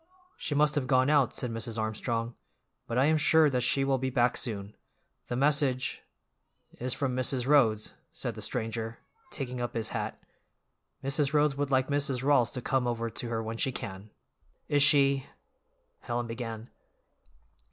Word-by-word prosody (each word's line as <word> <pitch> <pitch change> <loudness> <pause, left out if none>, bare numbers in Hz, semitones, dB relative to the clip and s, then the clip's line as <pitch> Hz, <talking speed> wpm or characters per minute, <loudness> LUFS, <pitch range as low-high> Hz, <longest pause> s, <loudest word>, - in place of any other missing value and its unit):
"She 145 - -3
must 150 +1 +3
have 140 -4 -1
gone 130 +1 +3
out," 140 -5 +4
said 125 - -2
Mrs. 115 0 -4
Armstrong, 115 +2 -2 0.5
"but 115 - -2
I 130 - +4
am 155 +1 +3
sure 155 -1 +5
that 125 -1 0
she 135 +3 +2
will 135 -1 +1
be 130 +1 -1
back 125 -1 +2
soon. 105 -3 -4 0.5
The 120 - -3
message—" 135 -2 +1 0.8
"Is 125 +1 -2
from 130 -3 -1
Mrs. 130 0 0
Rhodes," 115 -7 +3 0.2
said - - -3
the - - -9
stranger, 115 0 -3 0.3
taking 125 - -4
up 120 - -4
his 110 -1 -1
hat, - - -4 0.8
"Mrs. 140 +1 0
Rhodes 150 -1 +3
would 145 0 -1
like 130 0 +2
Mrs. 140 -3 0
Rawls 135 -4 +3
to 125 - -5
come 130 -2 +1
over 115 -1 -2
to 120 - -5
her 115 -1 -2
when 115 +1 -5
she 130 - +1
can." 100 -4 -7 0.6
"Is 145 -1 +2
she—" 140 -2 +4 0.7
Helen 120 0 -3
began. 115 -1 -6
125 Hz, 165 wpm, -29 LUFS, 115-140 Hz, 0.8 s, sure